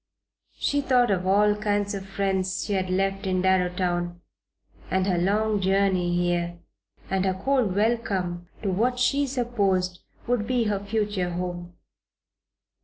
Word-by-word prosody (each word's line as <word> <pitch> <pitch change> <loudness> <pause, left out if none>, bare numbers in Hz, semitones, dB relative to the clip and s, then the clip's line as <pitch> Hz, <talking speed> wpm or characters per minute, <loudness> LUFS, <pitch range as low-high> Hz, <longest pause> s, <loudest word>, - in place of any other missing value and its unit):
She 285 0 +1
thought 250 -4 +3
of 185 -1 0
all 205 +2 +4
the 210 - -8
kind 205 -1 +1 0.2
friends 190 -1 -1
she 205 - -2
had 190 -1 0
left 195 +1 0
in 185 -1 0
Darrowtown, 180 -2 0 0.7
and 190 0 +1
her 180 -3 +1
long 210 +3 +1
journey 190 -2 +2
here, 175 -1 0 0.5
and 190 -1 +1
her 190 -1 +1
cold 225 -1 +1
welcome 195 -6 0 0.2
to 195 - 0
what 240 +7 +1
she 275 +3 +2
supposed 200 -8 0 0.3
would 240 -3 0
be 250 -2 +1
her 210 -2 0
future 205 -3 -1
home. 175 0 -5
195 Hz, 140 wpm, -25 LUFS, 180-215 Hz, 0.7 s, all